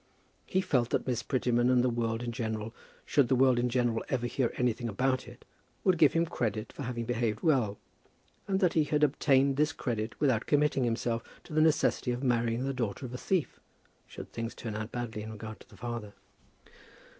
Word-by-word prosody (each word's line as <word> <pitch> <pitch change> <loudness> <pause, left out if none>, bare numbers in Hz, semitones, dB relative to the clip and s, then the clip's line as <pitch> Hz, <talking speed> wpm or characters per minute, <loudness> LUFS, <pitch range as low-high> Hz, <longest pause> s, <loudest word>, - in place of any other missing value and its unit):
He 190 - +1
felt 125 -9 +1
that - - 0
Miss 125 -2 -1
Prettyman 125 -2 +1
and 125 -1 +4
the - - +3
world 115 0 -1
in 120 - -3
general, 110 -2 -3 0.3
should 140 -4 +3
the 130 - +3
world 130 -1 +4
in 125 +1 +1
general 120 -2 +1
ever 125 -3 0
hear 120 0 0
anything 120 -1 0
about 130 +5 0
it, 120 +1 -13 0.4
would 185 -3 +3
give 150 -4 +6
him 165 0 +2
credit 110 -8 -3
for - - -8
having 120 -2 -3
behaved 115 -2 -1
well; 125 -11 +2 0.7
and 190 -1 +1
that 180 -3 +3
he 155 -2 +3
had 150 0 +1
obtained 140 -1 +3
this 150 +1 +3
credit 115 -7 -3
without 130 -7 +2
committing 145 -3 +2
himself 115 0 -1 0.2
to - - -11
the 155 - +3
necessity 155 -4 +2
of 120 +2 -2
marrying 120 -1 +1
the 135 - -1
daughter 120 -1 -3
of 125 - -7
a - - -3
thief, 185 -6 -1 0.5
should - - -10
things 115 0 -4
turn 115 -3 -5
out 110 +1 -4
badly 120 -3 -4
in 110 +1 -7
regard 110 0 -8
to - - -18
the - - -16
father. 120 -4 -5
120 Hz, 200 wpm, -30 LUFS, 115-135 Hz, 0.7 s, give